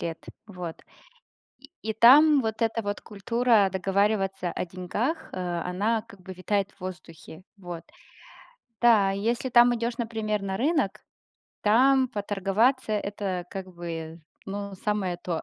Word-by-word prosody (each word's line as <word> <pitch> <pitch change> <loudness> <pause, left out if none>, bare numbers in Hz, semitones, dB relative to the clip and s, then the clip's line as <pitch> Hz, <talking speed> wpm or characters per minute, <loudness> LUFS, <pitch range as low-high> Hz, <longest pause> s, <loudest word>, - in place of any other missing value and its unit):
лет, 165 -1 -5 0.2
вот. 180 -5 -7 0.8
И 280 +2 -17
и 220 - -2
там 280 +6 +7
вот 220 0 -3
эта 225 0 0
вот 205 0 -3
культура 215 0 +2
договариваться 195 -1 0
о - - -3
деньгах, 195 - -3
э, - - -5 0.3
она 210 +5 0
как 220 -4 -16
бы 190 - -8
витает 195 +2 -1
в - - -27
воздухе, 170 -3 -9
вот. 175 -3 -8 1.0
Да, 215 -5 +5
и 195 - -3
если 235 +4 -1
там 240 0 +6
идешь, 235 0 -2
например, 220 -3 -2
на 190 -1 -3
рынок, 290 - 0 0.6
там 260 +5 +4
поторговаться- 205 +5 0
это 200 -3 -3
как 190 -2 -7
бы, 165 -1 -6 0.3
ну, 200 0 -5
самое 190 -3 -2
то. 175 -2 -4
205 Hz, 140 wpm, -26 LUFS, 185-230 Hz, 1.0 s, там